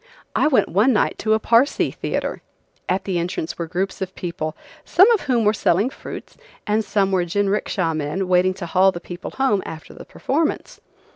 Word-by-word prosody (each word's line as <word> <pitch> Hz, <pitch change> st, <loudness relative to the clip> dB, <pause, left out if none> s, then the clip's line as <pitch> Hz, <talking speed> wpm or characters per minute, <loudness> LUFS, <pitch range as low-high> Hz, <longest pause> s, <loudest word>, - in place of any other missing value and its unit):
I -, -, +3 dB
went 280 Hz, -5 st, +3 dB
one 220 Hz, +8 st, +3 dB
night 210 Hz, -, +1 dB
to 220 Hz, 0 st, +2 dB
a -, -, 0 dB
Parsee 235 Hz, +5 st, +2 dB
theatre. -, -, -3 dB, 0.5 s
At 185 Hz, +2 st, 0 dB
the 185 Hz, -3 st, -1 dB
entrance 170 Hz, -1 st, -4 dB
were 170 Hz, -, -3 dB
groups 185 Hz, +4 st, -3 dB
of 190 Hz, 0 st, -4 dB
people, 165 Hz, -3 st, -4 dB, 0.3 s
some 370 Hz, +6 st, +5 dB
of 450 Hz, -, +3 dB
whom 245 Hz, -5 st, +1 dB
were 210 Hz, -, +4 dB
selling 210 Hz, +3 st, +1 dB
fruits, -, -, -9 dB, 0.3 s
and 215 Hz, +1 st, +1 dB
some 200 Hz, -2 st, +1 dB
were 185 Hz, -2 st, +2 dB
jinricksha 195 Hz, -2 st, 0 dB
men 155 Hz, +6 st, -2 dB
waiting 185 Hz, +1 st, +3 dB
to 185 Hz, -, -6 dB
haul 185 Hz, +3 st, +4 dB
the 175 Hz, -, -7 dB
people 175 Hz, +1 st, -8 dB
home 260 Hz, -7 st, +1 dB
after 160 Hz, -1 st, -9 dB
the -, -, -11 dB
performance. 310 Hz, +3 st, -2 dB
195 Hz, 190 wpm, -21 LUFS, 175-220 Hz, 0.5 s, some